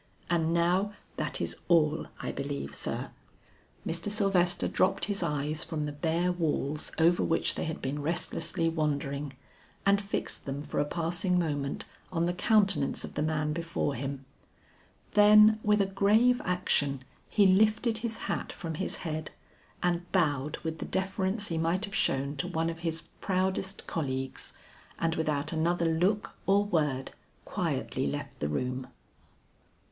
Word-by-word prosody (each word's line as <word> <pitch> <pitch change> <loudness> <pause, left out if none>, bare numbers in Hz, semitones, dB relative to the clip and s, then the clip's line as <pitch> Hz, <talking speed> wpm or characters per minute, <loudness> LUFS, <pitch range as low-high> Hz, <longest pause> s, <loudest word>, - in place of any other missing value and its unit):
And 165 -1 +2
now 180 +4 +2 0.2
that - - -2
is - - -1
all 160 -3 +3
I - - -3
believe, 140 - -4
sir." - - -3 0.7
Mr. 170 +4 -2
Sylvester 195 -4 +2
dropped 185 - +2
his 200 -1 -1
eyes 150 -2 -1
from 155 -2 -3
the 150 - -3
bare 165 +4 0
walls 155 -3 -1
over 170 +2 +4
which 165 - +2
they - - -3
had 160 -1 -5
been 140 +2 -2
restlessly 165 +2 -1
wandering, 145 -3 -1 0.5
and 200 0 +4
fixed 200 0 -4
them 140 +1 -4
for - - -3
a 145 - +2
passing 170 +4 0
moment 145 -5 -1 0.3
on 170 -2 +1
the 175 - 0
countenance 195 -5 +2
of - - -7
the - - -2
man 155 -1 0
before 165 -3 -1
him. 135 +2 -4 0.9
Then 210 +1 +7
with 210 -1 +3
a - - +3
grave 215 +6 +3
action 145 -7 +1 0.3
he 205 - +4
lifted 215 +4 +4
his 225 -1 -3
hat - - -2
from 165 -2 -5
his - - -1
head, 155 -1 -3 0.5
and 175 0 0
bowed 150 -6 +1
with 160 -1 -3
the - - -3
deference 190 +2 -1
he 165 -1 -1
might 170 +5 +1
have 200 - -11
shown 140 -2 +1
to 155 - -2
one 165 -2 0
of 165 - -9
his 165 -1 -2 0.2
proudest 190 0 -1
colleagues, 135 -5 -3 0.4
and 165 -1 +1
without 155 -1 -1
another 170 +2 +1
look 200 +5 +1
or 200 +1 +4
word, 150 -8 0 0.3
quietly - - -1
left 70 - -5
the 75 - -1
room. 125 - -2
165 Hz, 150 wpm, -30 LUFS, 150-190 Hz, 0.9 s, Then